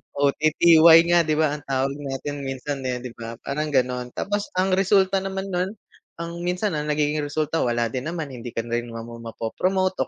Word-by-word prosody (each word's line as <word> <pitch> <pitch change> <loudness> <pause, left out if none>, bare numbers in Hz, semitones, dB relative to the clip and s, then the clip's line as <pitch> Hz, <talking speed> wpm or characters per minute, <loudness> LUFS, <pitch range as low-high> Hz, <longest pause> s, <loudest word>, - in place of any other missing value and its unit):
OTTY 155 +3 +6
nga 175 - +6
'di 155 - +2
ba 155 0 +3
ang 150 -1 -5
tawag 135 0 0 0.2
natin 145 +2 -4
minsan, 135 +1 -4
eh, 125 0 -3
'di 125 - -6
ba? 115 0 -6
Parang 150 +2 -2
gano'n. 125 -3 -1
Tapos 205 +1 -2
ang 185 +1 +1
resulta 195 0 +3
naman 195 0 -4
nun, 185 +4 -1 0.4
ang 170 0 -6
minsan 180 +4 -1
ang 150 -1 -3
nagiging 150 0 +1
resulta 155 +2 -1
wala 120 -2 0
din 130 +3 -4
naman, 160 -5 -4
hindi 120 -1 -8
ka 115 - -1
rin 120 0 -3
naman 115 0 -8
mapo-promote 185 +12 -1
150 Hz, 185 wpm, -24 LUFS, 125-175 Hz, 0.4 s, OTTY